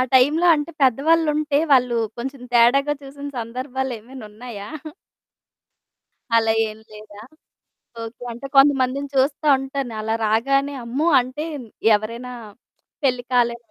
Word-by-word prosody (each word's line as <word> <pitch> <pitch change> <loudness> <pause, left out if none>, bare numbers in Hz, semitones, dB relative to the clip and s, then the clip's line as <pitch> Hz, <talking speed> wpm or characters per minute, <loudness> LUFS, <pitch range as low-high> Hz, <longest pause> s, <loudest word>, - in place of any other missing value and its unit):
టైంలో 295 +7 +4
అంటే 295 +2 -3
పెద్దవాళ్ళుంటే 300 +2 +2
వాళ్ళు 250 -3 +4 0.2
కొంచెం 265 +1 -6
తేడాగా 275 +5 +4
చూసిన 280 +1 -8
సందర్భాలేమైనున్నాయా? 240 -3 -6 1.7
అలా 225 -1 +3 0.2
ఏం 215 0 -10
లేదా? 210 -1 -13 0.8
ఓకే. 225 +2 -9
అంటే 250 +4 -8
కొంతమందిని 275 0 +4
చూస్తా 280 +3 +1
ఉంటాను. 270 -2 -4
అలా 220 +1 -1
రాగానే 275 +6 +1
అమ్మో! 270 +8 -1
అంటే 255 +5 -5 0.5
ఎవరైనా 230 +4 -3 0.7
పెళ్లి 250 -2 +1
కాలే 240 -1 +2
255 Hz, 100 wpm, -21 LUFS, 235-280 Hz, 1.7 s, టైంలో